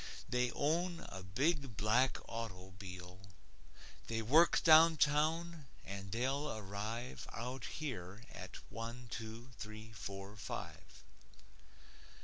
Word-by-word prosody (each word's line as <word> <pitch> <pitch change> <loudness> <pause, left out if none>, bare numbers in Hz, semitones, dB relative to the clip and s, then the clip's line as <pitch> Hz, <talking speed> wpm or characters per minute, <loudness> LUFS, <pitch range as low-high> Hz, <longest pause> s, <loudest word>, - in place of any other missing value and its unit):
They 125 0 +2
own 170 +3 +1
a 95 - -6
big 135 - 0
black 120 +5 +4
auto'bile. 95 -4 -7 0.9
They 115 0 -1
work 155 +9 +6
downtown, 160 0 +5 0.2
and 95 0 -6
they'll 135 +6 0
arrive 110 +4 -4
Out 125 +2 -4
here 110 - -5
at - - -8 0.2
one 115 +1 -6
two 115 +3 -6
three 110 +1 -7
four 100 0 -6
five. 100 - -7
115 Hz, 100 wpm, -37 LUFS, 100-145 Hz, 0.9 s, work